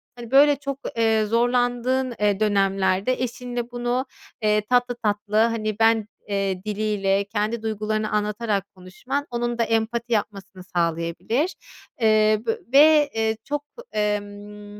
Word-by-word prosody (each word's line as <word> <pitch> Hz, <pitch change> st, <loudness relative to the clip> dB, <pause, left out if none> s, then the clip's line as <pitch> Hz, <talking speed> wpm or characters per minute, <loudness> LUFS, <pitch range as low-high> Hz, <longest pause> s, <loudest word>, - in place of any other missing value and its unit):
hani, 240 Hz, -1 st, -10 dB
böyle, 285 Hz, +2 st, +6 dB
çok, 275 Hz, -1 st, -5 dB, 0.2 s
ııı, 220 Hz, -1 st, +2 dB
zorlandığın, 245 Hz, +2 st, +1 dB
ııı, 205 Hz, -1 st, +2 dB
dönemlerde 195 Hz, +1 st, +1 dB
eşinle 245 Hz, 0 st, -4 dB
bunu, 245 Hz, +2 st, -1 dB, 0.4 s
ııı, 210 Hz, 0 st, +3 dB
tatlı 245 Hz, 0 st, +2 dB
tatlı, 210 Hz, 0 st, -1 dB
hani, 220 Hz, -1 st, +1 dB
ben, 225 Hz, -1 st, +3 dB, 0.2 s
ııı, 195 Hz, -2 st, -1 dB
diliyle 205 Hz, -2 st, 0 dB
kendi 215 Hz, +2 st, -2 dB
duygularını 215 Hz, 0 st, -2 dB
anlatarak 210 Hz, -1 st, -1 dB
konuşman 250 Hz, +10 st, -5 dB
onun 240 Hz, 0 st, -2 dB
da 235 Hz, -, +2 dB
empati 230 Hz, +1 st, -1 dB
yapmasını 195 Hz, -3 st, -3 dB
sağlayabilir. 170 Hz, -, -1 dB, 0.5 s
Iıı, 225 Hz, -, +4 dB, 0.4 s
v 225 Hz, -, +1 dB, 0.2 s
ve, 300 Hz, +1 st, +6 dB
ııı, 220 Hz, 0 st, +1 dB
çok, 290 Hz, +3 st, -3 dB, 0.3 s
emm 205 Hz, 0 st, -4 dB
220 Hz, 125 wpm, -23 LUFS, 205-245 Hz, 0.5 s, böyle